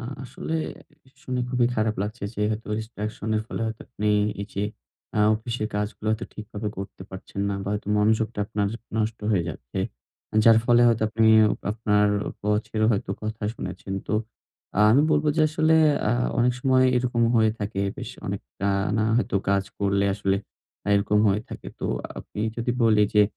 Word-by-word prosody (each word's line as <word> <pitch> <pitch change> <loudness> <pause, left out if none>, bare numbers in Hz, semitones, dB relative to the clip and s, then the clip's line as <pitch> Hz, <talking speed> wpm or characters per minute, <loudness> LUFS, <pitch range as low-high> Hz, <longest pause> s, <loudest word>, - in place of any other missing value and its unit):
আ - - -8 0.2
আসলে 135 +5 -5 0.7
শুনে 125 -1 -2
খুবই 125 -1 +3
খারাপ 110 0 +1
লাগছে, 105 +2 -5
যে - - -5
হয়তোবা 105 0 -3
ডিস্ট্রাকশনের 110 0 -3
ফলে - - -5
হয়তো 110 0 -5
আপনি 105 -3 -2 0.3
এই 100 - -6
যে 100 - -1 0.5
আ - - +3
অফিসের 110 0 -3
কাজগুলো 105 +1 -3
হয়তো 110 +1 -1
ঠিকভাবে 105 0 -5
করতে 95 0 -7
পারছেন 95 +1 -7
না 100 - -1
বা 100 - -4
হয়তো 105 -1 -4
মনোযোগটা 110 +1 +1
আপনার 105 -2 -1 0.3
নষ্ট 110 +1 -1
হয়ে 95 -5 +3
যাচ্ছে। 60 -5 -7 0.7
যার 115 -1 +8
ফলে 120 0 +5
হয়তো 115 -1 +2
আপনি 110 +1 +2 0.5
আপনার 105 -2 +2 0.4
বসেরও 105 +1 0
হয়তো 100 - -2
কথা 110 +1 -5
শুনেছেন। 95 - -6
তো - - -1 0.8
আমি 135 +6 +5
বলব 150 0 +3
যে 160 - +3
আসলে 155 +1 +3 0.3
আ - - +3 0.3
অনেক 125 +1 +4
সময় 130 0 +4
এরকম 120 -1 +1
হয়ে 110 -1 +4
থাকে, 100 -1 -3 0.2
বেশ - - -6 0.2
অনেক - - -3 0.2
টানা 100 +2 +1
হয়তো 120 - +1
কাজ 100 0 +2
করলে 100 0 +1
আসলে 100 -1 0 0.6
এরকম 100 +1 +2
হয়ে 100 +2 +2
থাকে। - - -9
তো - - -1 0.3
আমি 105 - -7 0.2
যদি 115 +1 -1
বলি 110 -2 +5
যে 105 - +7
110 Hz, 165 wpm, -25 LUFS, 105-115 Hz, 0.8 s, যার